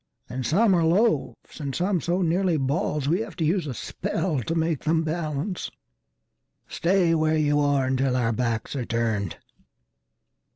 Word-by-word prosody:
And 125 -1 -4
some 200 +5 +4
are 170 -2 +3
loaves 200 +5 0
and 140 -3 -4
some 180 -1 0
so 175 +4 0
nearly 175 0 +1
ballsWe 150 +5 0
have 210 -6 -10
to 165 - -1
use 170 0 +1
a 135 - -3
spell 155 +2 -2
to 165 +8 -3
make 160 -3 0
them 160 +1 +2
balance:"Stay 160 - -3
where 155 -1 +2
you 145 -1 +2
are 145 -2 +2
until 130 0 +1
our 120 -2 +1
backs 115 +1 -2
are 130 - -2
turned!" 115 -6 -1
155 Hz, 150 wpm, -25 LUFS, 130-175 Hz, -, some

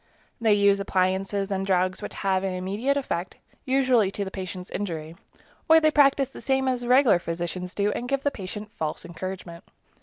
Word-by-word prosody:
They 220 -2 +4
use 200 -1 +4
appliances 195 +1 0
and 195 0 -1
drugs 185 -1 +1
which - - -7
have 190 -1 +2
an 190 -1 -2
immediate 205 +10 -1
effect, 185 -10 -3 0.3
usually 255 -6 +3
to 200 - -3
the 190 - -6
patients' 185 -1 -6
injury; 165 -5 -4 0.5
or 320 0 +8
they 310 -1 +3
practice 275 -2 +4
the - - -11
same 265 0 +1
as 245 -2 -1
regular 250 -7 +5
physicians 175 +2 -4
do 205 0 +1
and 245 +3 -4
give 275 0 0
the 285 - +1
patient 210 +1 -7
false 155 -6 -4
encouragement. 175 0 -7
195 Hz, 180 wpm, -25 LUFS, 185-250 Hz, 0.5 s, or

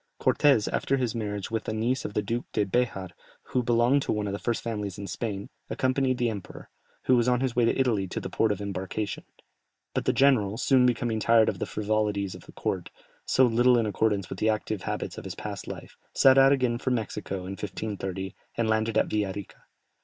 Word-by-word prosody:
Cortès, 135 -8 +3
after 135 - +1
his 125 -4 -1
marriage 105 -3 -4
with 115 -1 -2
the - - -2
niece 120 +4 0
of 105 - -5
the 105 - +1
Duke 115 +4 -2
de 105 - +2
Béjar, 95 -4 -1 0.4
who 125 - +1
belonged 120 +3 +3
to - - -2
one 105 -1 -1
of 100 - -3
the 100 - -3
first 120 -1 -2
families 105 -5 -3
in 100 - -6
Spain, 100 +1 -4 0.2
accompanied 130 0 +1
the 120 -2 +1
emperor, 100 -4 -9 0.3
who 130 - +4
was 120 0 +2
on 125 -1 +3
his 130 -3 -1
way 120 -1 +4
to 115 - +1
Italy, 110 -7 +1
to - - -4
the - - -5
port 110 - +1
of 105 - -2
embarkation; 100 +1 -4 0.7
but - - -1
the - - +4
general, 115 -7 +3
soon 130 0 +4
becoming 115 -2 0
tired 115 0 +5
of - - -4
the - - -2
frivolities 105 -2 -1
of - - -13
a - - -9
court, - - -3 0.4
so 130 - +5
little 120 +1 +4
in 115 - +2
accordance 105 -3 0
with 95 - -7
the 110 - +2
active 110 -2 -1
habits - - -4
of - - -10
his - - -6
past - - -6
life, - - -8 0.2
set 135 -1 +7
out 135 0 +7
again 125 -4 +1
for 130 - -2
Mexico 110 -5 -2
in 95 - -5
1530, 95 -1 -4 0.2
and 115 - +1
landed 110 0 +1
at - - +4
Villa 105 -2 -1
Rica. 100 -1 -9
110 Hz, 220 wpm, -27 LUFS, 100-125 Hz, 0.7 s, set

